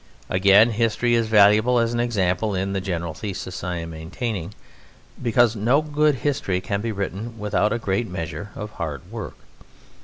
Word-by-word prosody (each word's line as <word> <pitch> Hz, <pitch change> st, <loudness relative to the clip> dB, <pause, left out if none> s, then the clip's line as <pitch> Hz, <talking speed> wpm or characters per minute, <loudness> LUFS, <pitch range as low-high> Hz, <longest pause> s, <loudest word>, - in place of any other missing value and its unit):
Again, 100 Hz, +5 st, +5 dB
History 115 Hz, +2 st, +1 dB
is 115 Hz, -1 st, +2 dB
valuable 110 Hz, +3 st, +5 dB
as 115 Hz, 0 st, +1 dB
an 120 Hz, -, -1 dB
example 100 Hz, -4 st, 0 dB
in 95 Hz, +1 st, -1 dB
the 95 Hz, -, -1 dB
general 85 Hz, -3 st, -3 dB
thesis 95 Hz, -1 st, -6 dB
I 90 Hz, 0 st, -2 dB
am 85 Hz, 0 st, -6 dB
maintaining, 95 Hz, +4 st, -5 dB, 0.7 s
because 120 Hz, -1 st, +3 dB
no 120 Hz, +8 st, +2 dB
good 150 Hz, -1 st, +2 dB
history 100 Hz, -10 st, 0 dB
can 100 Hz, +2 st, -3 dB
be 115 Hz, +1 st, -2 dB
written 105 Hz, +3 st, -4 dB
without 105 Hz, -1 st, 0 dB
a 115 Hz, -, +1 dB
great 110 Hz, +1 st, -1 dB
measure 90 Hz, +3 st, -5 dB
of 105 Hz, 0 st, -6 dB
hard 75 Hz, -8 st, -6 dB
work. -, -, -7 dB
105 Hz, 165 wpm, -23 LUFS, 95-115 Hz, 0.7 s, Again